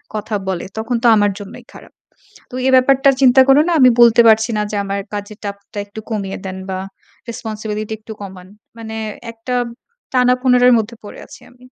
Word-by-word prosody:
কথা 215 0 -4
বলে 180 -2 -3
তখন 225 +3 -2
তো - - +4
আমার 205 -1 +2
জন্যই 200 -1 -11
খারাপ। - - -14 0.6
তো - - -12
এ - - +4
ব্যাপারটার 270 +1 +4
চিন্তা 260 0 +6
করেও 285 +3 +5
না - - +1
আমি 255 - +7
বলতে 235 0 +6
পারছি 220 +1 +4
না 210 - +1
যে, 210 - -3
"আমার 200 0 -3
কাজের 205 +1 -7
চাপটা 200 +1 -8
একটু 205 +2 -9
কমিয়ে 200 -3 -4
দেন 185 0 -6
বা 185 - -3 0.5
responsibility 215 -1 -5
একটু 220 0 -10
কমান।" 185 -2 -10 0.3
মানে 220 -1 -7 0.4
একটা 230 +2 -6 0.9
টানা-পোড়নের 250 -1 +4
মধ্যে 225 +2 -4
পড়ে 205 - -10
আছি - - -14
আমি। 250 0 -21
220 Hz, 180 wpm, -17 LUFS, 205-245 Hz, 0.9 s, আমি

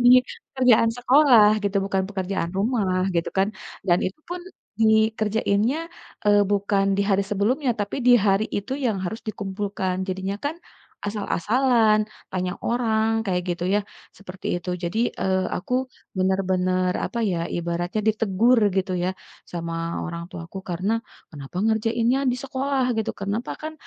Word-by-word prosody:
Iya, 245 +1 +8 0.4
pekerjaan 245 -3 +5
sekolah 245 -4 +6 0.2
gitu 200 0 0
bukan 195 -1 0
pekerjaan 190 -3 -2
rumah 195 -4 +1
gitu 165 - 0
kan, 195 +2 +3 0.4
dan 175 +1 +5
itu 185 - -5
pun, 355 0 -4 0.4
dikerjainnya, 220 +3 +2 0.5
eee, 205 0 +5
bukan 200 -1 +1
di 200 - +2
hari 200 -1 +2
sebelumnya 245 +7 +1
tapi 205 +4 -3
di 245 -1 +8
hari 200 +2 +2
itu 205 +6 -4
yang 220 -4 +1
harus 220 +5 -4
dikumpulkan, 195 -2 -3
jadinya 190 +1 -2
kan, 295 +3 -3 0.5
asal-asalan, 215 +2 +2 0.3
tanya 185 -1 -1
orang 225 -2 +1 0.2
kayak 180 -1 0
gitu 175 0 -4
ya, 205 - +3 0.4
seperti 190 -2 -9
itu. 180 +1 -5
Jadi, 180 +6 -1
eee, 190 0 0
aku 195 +7 -3 0.4
bener-bener, 185 -1 +1
apa 235 - -4
ya, 180 -6 0
ibaratnya 175 +4 -2
ditegur 220 +3 +3 0.2
gitu 190 0 0
ya, 185 - +1 0.4
sama 170 -1 -4 0.3
orang 170 -1 -5
tuaku 170 +3 -7
karena 185 +5 -1 0.4
kenapa 145 +2 -10
ngerjainnya 225 +3 +2
di - - -2
sekolah 270 0 -1
gitu, 220 - 0
kenapa 205 +5 -2
kan 310 +1 -5
205 Hz, 140 wpm, -24 LUFS, 185-230 Hz, 0.5 s, Iya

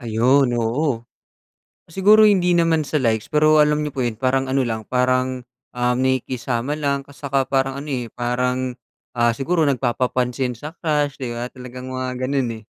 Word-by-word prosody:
Ayon, 120 +3 +2
oo. 120 +1 -1 0.8
Siguro 205 +5 +5
hindi 180 -4 +3
naman 165 -2 +3
sa 150 +1 -2
likes, 115 -5 0
pero 155 0 +4
alam 150 0 +2
niyo 145 - -5
po 130 - -3
'yon, 120 -3 -2
parang 130 +1 0
ano 135 -1 +1
lang, 110 -1 -3
parang, 130 0 0 0.2
um, 125 0 0
nakikisama 130 0 -1
lang 140 -2 -2
at 140 - -16
saka 140 -2 -1
parang 135 0 0
ano, 140 - -6
eh, 120 -3 -3
parang, 125 +1 -1 0.4
ah, 120 -1 +1
siguro 165 +5 0
nagpapapansin 125 -1 -1
sa 150 +6 -8
crush, 145 -4 0
'di 125 - -3
ba? 120 - -3
Talagang 125 0 -9
mga 130 0 -3
gano'n, 135 -2 0
eh. 110 - -14
130 Hz, 170 wpm, -21 LUFS, 125-145 Hz, 0.8 s, Siguro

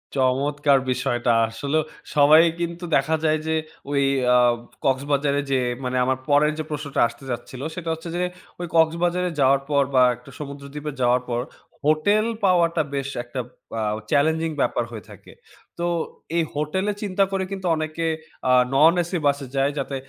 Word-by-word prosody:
চমৎকার 140 +2 +2
বিষয়টা। 120 -1 0 0.2
আসলে 140 +7 -2 0.4
সবাই 150 +2 +7 0.2
কিন্তু 170 +1 -4
দেখা 150 +4 +2
যায় 155 0 +2
যে, 160 - +1 0.3
ঐ - - -4 0.4
অ্যা 125 0 +5 0.5
কক্সবাজারে 140 +1 +1
যেয়ে, 125 -2 +1
মানে 125 0 -1
আমার 130 0 +1
পরের 150 +1 +4
যে - - -1
প্রশ্নটা 150 -2 -2
আসতে 120 +3 -14
যাচ্ছিলো 130 +3 -6
সেটা 175 -3 -5
হচ্ছে 160 +1 -7
যে, 180 - 0 0.4
ওই 175 - -3
কক্সবাজারে 175 +2 +2
যাওয়ার 135 0 +4
পর 140 -1 +3
বা 130 - +7 0.4
সমুদ্রদ্বীপে 145 +1 -7
যাওয়ার 125 +1 +3
পর 120 0 0 0.4
হোটেল 180 +8 +3 0.2
পাওয়াটা 170 -3 +3
বেশ 135 0 -2
একটা 120 +2 -6 0.4
অ্যা 110 - -1 0.3
চ্যালেঞ্জিং 160 +2 +2
ব্যাপার - - +1
হয়ে 110 -4 -8
থাকে। - - -14 0.5
তো 170 - 0 0.5
এই 165 - +3
হোটেলে 170 +8 -1
চিন্তা 195 -1 +1
করে 195 -1 0
কিন্তু 190 -1 -5
অনেকে 155 +1 -3 0.4
আ - - +5 0.2
নন 155 +5 +6
এসি 175 +2 -3
বাসে 140 -1 0
যায় 135 +1 +2
যাতে 135 0 -3
145 Hz, 155 wpm, -23 LUFS, 135-165 Hz, 0.5 s, সবাই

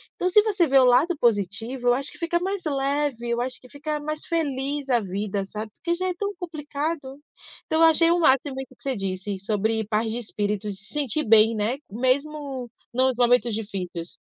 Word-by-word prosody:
Então, 365 - 0
se 420 +4 +6
você 400 -5 +2
vê 270 -2 +5
o 260 - +6
lado 295 +8 +4
positivo, 230 +3 0
eu 245 - +6
acho 275 +2 -1
que - - -13
fica 345 0 0
mais 385 +1 -3
leve. 275 -4 -1
Eu 235 0 0
acho 255 +1 -3
que 255 - -17
fica 295 +2 -4
mais 305 +1 -5
feliz 285 -3 -1
a 245 -2 +4
vida, 200 0 -3
sabe? 215 +2 -6
Porque 340 +1 -2
já 370 +2 -2
é 365 - 0
tão 405 +2 -3
complicado. 295 -4 -4 0.5
Então 320 +1 +1
eu 325 - +8
achei 330 +1 +5
o 350 - +3
máximo 275 -3 +3
que 265 -1 -7
você 270 -2 -2
disse 195 0 -3
sobre 220 +2 0
paz 220 +1 +1
de 230 - -2
espírito 210 -2 -3
e - - -3
se 200 +2 -13
sentir 295 0 0
bem, 225 +1 +6
né? 220 +5 0
Mesmo 265 +2 -1 0.2
nos 260 +1 +3
momentos 245 -1 +3
difíceis. 185 -5 -5
260 Hz, 200 wpm, -24 LUFS, 220-305 Hz, 0.5 s, eu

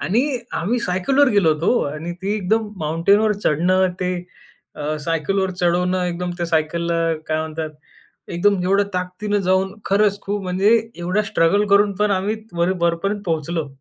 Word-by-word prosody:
आणि 220 +7 +1 0.3
आम्ही 225 +9 0
सायकलवर 255 +10 +2
गेलो 195 -7 +4
होतो 165 +11 +1
आणि 165 +3 -5
ती 200 +2 0
एकदम 215 +2 0
माउंटेनवर 170 +8 +2
चढणं 185 +5 +3
ते 180 0 0 0.6
अ, 150 +1 -2
सायकल 165 +5 -1
वर 190 -1 +1
चढवणं 180 +1 +1
एकदम 180 0 -3
त्या 175 - -1
सायकलला 170 +1 0 0.3
काय 155 - +1
म्हणतात? 160 0 -4 0.6
एकदम 185 +2 +1
एवढ्या 195 +2 +3
ताकदीनं 185 +3 -2
जाऊन 190 +1 +1
खरंच 205 0 +2
खूप 205 0 -3
म्हणजे 185 +3 +1 0.3
एवढा 180 +4 0
स्ट्रगल 200 +1 +2
करून 200 0 +4
पण 210 0 +1
आम्ही 195 +3 0 0.2
वर 170 +2 +2
वरपर्यंत 185 +5 0
पोहोचलो. 160 -1 -1
185 Hz, 150 wpm, -21 LUFS, 170-205 Hz, 0.6 s, गेलो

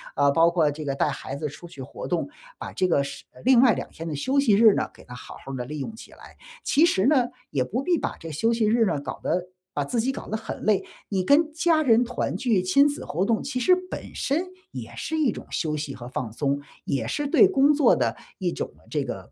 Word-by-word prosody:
啊， 140 0 +4
包 165 +3 +5
括 165 -3 +3
这 150 +2 -7
个 140 -2 -2
带 145 - +1
孩 135 -1 -5
子 150 - -3
出 145 +4 -10
去 140 - -10
活 130 - -8
动， 175 -2 -1 0.3
把 - - -7
这 185 - +1
个 165 - +3
是 140 0 -7
呃， - - -16
另 255 -2 +6
外 245 -4 +6
2 - - -5
天 165 - -9
的 160 - -3
休 260 - +1
息 240 -7 +3
日 215 0 +7
呢， - - -1
给 - - -17
它 125 - -10
好 125 - -10
好 135 - -6
儿 - - -3
地 125 - -3
利 150 +3 -6
用 220 +11 -5
起 - - -13
来。 - - -15 0.3
其 315 +4 +4
实 195 - +2
呢， 260 -3 +3 0.2
也 130 - 0
不 225 - -2
必 345 +3 +1
把 - - -3
这 165 - -8
休 160 +10 +1
息 230 -1 +1
日 225 +1 +3
呢 165 -7 0
搞 - - -6
得 180 +2 -1 0.3
把 145 - -1
自 235 - -1
己 260 +4 0
搞 - - -8
得 220 - -2
很 225 - -7
累。 210 -3 +2 0.3
你 190 -3 0
跟 305 - +4
家 320 0 +3
人 240 -3 +5
团 245 0 -3
聚， 225 -8 +1
亲 275 +11 +4
子 290 - -4
活 175 +5 -1
动 225 +1 +1
其 270 -2 -3
实 365 +9 +5
本 - - -7
身 315 +6 0 0.3
也 - - -8
是 320 - -3
一 295 -7 +2
种 - - -9
休 155 -2 -1
息 145 -2 -4
和 120 -1 -9
放 125 -3 -4
松， 140 +4 -1 0.2
也 130 -6 -1
是 290 - -2
对 340 +7 +6
工 295 -5 +4
作 290 -2 +4
的 - - 0 0.2
一 - - -1
种 - - -4
呢 - - -24
这 - - 0
个 - - -7
200 Hz, 280 characters per minute, -25 LUFS, -, 0.3 s, 日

